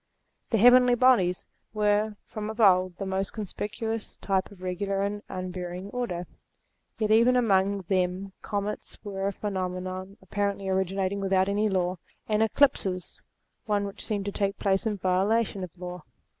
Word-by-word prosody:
The 225 - +2
heavenly 245 +2 +7
bodies 230 -8 +3 0.3
were 210 0 +2
from 215 -1 -5
of 220 +2 -7
old 185 -4 +4
the 195 - -4
most 190 0 -2
conspicuous 220 +1 -4
types 190 -1 -1
of 185 -2 -14
regular 195 +2 -1
and 205 +1 -2
unvarying 185 +1 -5
order: 205 -9 -3 0.7
yet 215 -1 0
even 235 +3 +5
among 200 -4 +3
them 185 +1 -1
comets 205 0 -4
were 195 -2 -3
a - - 0
phenomenon 185 -1 -4
apparently 200 +1 -2
originating 190 +1 0
without 190 -1 +2
any 205 +2 +1
law, 185 -2 0 0.3
and 215 0 +1
eclipses, 210 -6 +1 0.5
one 205 -1 +1
which 200 - -7
seemed 205 -2 -2
to 200 - -2
take 200 0 -1
place 195 +2 +1
in 210 -2 -1
violation 195 +3 +1
of 180 0 -8
law. 180 -1 -6
195 Hz, 150 wpm, -27 LUFS, 185-210 Hz, 0.7 s, heavenly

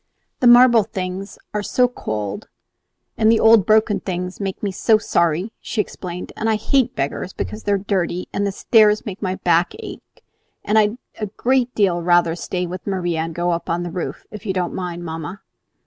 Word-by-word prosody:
"The 250 - +3
marble 240 -1 +7
things 190 0 -5 0.2
are 210 - -1
so 250 +4 +2
cold, 105 - -5 0.7
and 220 0 +5
the 230 - +3
old 225 -4 +6
broken 215 -1 +3
things 180 0 -4
make 195 0 -4
me 200 - 0
so 215 +3 +3
sorry," 170 0 0
she 225 - -5
explained; 180 -3 -4
"and 225 - -1
I 220 - +3
hate 250 +3 +1
beggars 140 +7 -3
because 215 - -5
they 205 - -2
are - - +3
dirty, 185 -3 -2
and 200 0 0
the - - -1
stairs 215 +2 +3
make 200 -3 -6
my 185 -2 -1
back 175 -1 +2
ache; 440 -1 -11 0.4
and 215 +1 +3
I'd 210 +2 +2 0.2
a 210 - -2
great 250 +4 0
deal 185 -5 +2
rather 175 -1 +3
stay 180 +1 -3
with 180 +3 -7
Maria 175 -4 -1
and 165 0 -3
go 175 +1 0
up 170 0 -3
on 170 +1 -1
the 175 - -5
roof, 180 0 -5
if 210 -3 -9
you 195 - -2
don't 180 -2 -2
mind, 175 -1 -5
mamma." 160 +3 -6
190 Hz, 195 wpm, -20 LUFS, 175-215 Hz, 0.7 s, marble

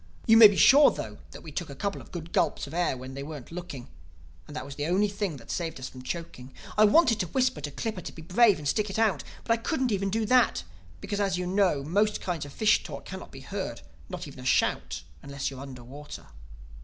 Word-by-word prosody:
You 225 - +6
may 225 -1 +11
be 205 - -1
sure 285 +8 +7
though 105 -1 -6
that - - -12
we 160 - -9
took 155 +2 -4
a 140 - -8
couple 200 +7 -3
of - - -16
good 170 -1 -7
gulps - - +1
of 140 - -10
air 170 -6 0
while 130 +1 -8
they 135 +1 -7
weren't 145 -2 -8
looking; 165 -8 -7 0.6
and 150 - -10
that 155 - -4
was 140 - -8
the 145 +2 -3
only 190 +4 +3
thing 200 -6 -3
that 115 - -10
saved 165 -4 -3
us 130 - -5
from 130 - -11
choking. 130 -3 -7 0.2
I 215 - +6
wanted 230 0 +4
to 180 - -1
whisper 255 - 0
to 145 - -4
Clippa 205 +6 -4
to - - -5
be 160 - -11
brave 200 +4 +4
and 150 -1 -5
stick 210 +7 +1
it 195 - -4
out. 215 -9 +2 0.2
But 230 - +2
I 230 - -2
couldn't 260 -3 0
even 195 -1 0
do 220 +2 0
that; 230 - +3 0.4
because, 205 - -3
as 195 -3 +1
you 180 - -2
know, 185 -6 +2
most 205 +8 +1
kinds 170 -5 -3
of 145 - -10
fish 215 +8 +3
talk - - -8
cannot - - -8
be - - -10
heard—not 70 0 -7
even - - -11
a - - -9
shout—unless 140 - -1
you're 135 - -9
under 130 -3 -9
water. 145 +4 -10
175 Hz, 240 wpm, -28 LUFS, 140-210 Hz, 0.6 s, may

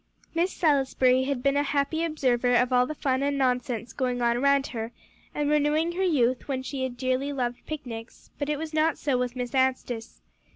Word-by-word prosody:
Miss 340 +3 +1
Salisbury 265 -4 +2
had 270 -2 -2
been 275 0 +3
a 285 - +3
happy 290 +3 0
observer 250 -6 +1
of 250 +1 +3
all 250 0 +4
the 310 - -5
fun 265 -2 0
and 280 0 0
nonsense 250 -3 -1
going 250 -2 -1
on 235 -1 +2
around 280 +2 +3
her, 225 -3 -5 0.4
and 295 -1 0
renewing 300 +3 +2
her 355 +2 -3
youth 255 -8 +1
when 260 -2 -2
she 270 0 -4
had 255 -2 -3
dearly 255 +3 0
loved 245 -3 -3
picnics; 240 -7 -7
but 285 0 -2
it 300 - 0
was 315 +1 -6
not 310 0 +2
so 280 -3 0
with 250 0 -1
Miss 250 +1 -4
Anstice. 255 -3 -1
265 Hz, 200 wpm, -27 LUFS, 250-290 Hz, 0.4 s, all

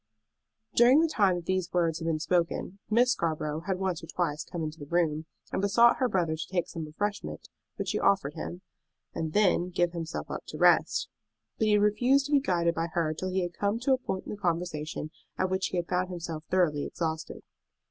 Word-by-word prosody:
During 245 +5 +6
the 330 - +4
time 200 - +3
that 175 -1 -5
these 185 -1 -1
words 165 -3 +1
had 165 - -4
been 160 -1 +1
spoken 175 +3 -1
Miss 240 +3 +4
Scarborough 155 -6 -1
had 190 -2 0
once 185 -3 -2
or - - -8
twice 155 -4 -2
come 170 -2 -5
into 155 +1 -5
the 145 - -8
room, 160 -1 0 0.2
and - - -1
besought 235 +4 +5
her 255 - +1
brother 170 -6 +1
to 160 - -5
take 180 -3 -1
some 165 -1 -5
refreshment 205 +7 -4 0.3
which - - -3
she - - 0
offered 190 -8 +2
him, 175 +3 -6 0.5
and 160 -1 -3
then 185 -3 +3
give 175 -1 +1
himself 160 - -5
up - - -4
to - - -7
rest. - - +4 0.5
But 220 - +2
he 210 - +4
had 205 0 +4
refused 245 +7 +3
to 290 - -6
be 285 - +6
guided 170 -10 +1
by 165 0 -1
her 165 -3 +1
till 185 +4 -4
he 185 0 0
had 175 0 -4
come 205 +4 0
to 265 +1 +3
a 260 - +1
point 190 -6 -4
in - - -6
the 210 - -5
conversation 165 -4 -2 0.3
at 185 0 0
which 190 0 +1
he 185 - -3
had 170 -1 -1
found 180 0 0
himself 165 -3 -5
thoroughly 170 -6 +2
exhausted. 160 -1 -4
175 Hz, 220 wpm, -29 LUFS, 165-200 Hz, 0.5 s, During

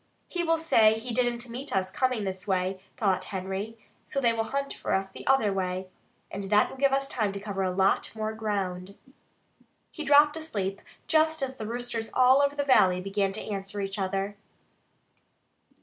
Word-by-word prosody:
"He 350 -1 -2
will 330 -1 +2
say 225 -9 +4
he 235 +2 -5
didn't 240 0 0
meet 245 0 -4
us 185 -1 0
coming 255 -1 0
this 190 -1 -4
way," 185 0 0 0.2
thought 190 -5 +1
Henry, 195 +4 -4 0.3
"so 275 - -3
they 235 -3 +3
will 225 -1 -1
hunt 275 +3 -2
for - - -3
us 195 0 0
the - - -11
other 265 -7 +3
way. 185 0 -2 0.4
And 200 - -5
that 210 +2 +3
will - - -10
give 275 0 +3
us 275 0 +1
time 215 -7 -1
to 200 - -5
cover 200 -1 -4
a 190 - +1
lot 190 +1 +1
more 215 0 -2
ground." 200 -3 -3 1.0
He 310 - -6
dropped 295 +1 +6
asleep 205 -12 -3 0.2
just 315 -1 +2
as 260 -1 -3
the 215 - -5
roosters 235 -1 -3
all 260 +2 +6
over 285 0 +1
the 285 - 0
valley 190 -10 +4
began 195 +1 -1
to 215 - -6
answer 195 +1 -4
each 195 +1 -3
other. 195 +1 -2
215 Hz, 185 wpm, -28 LUFS, 195-260 Hz, 1.0 s, dropped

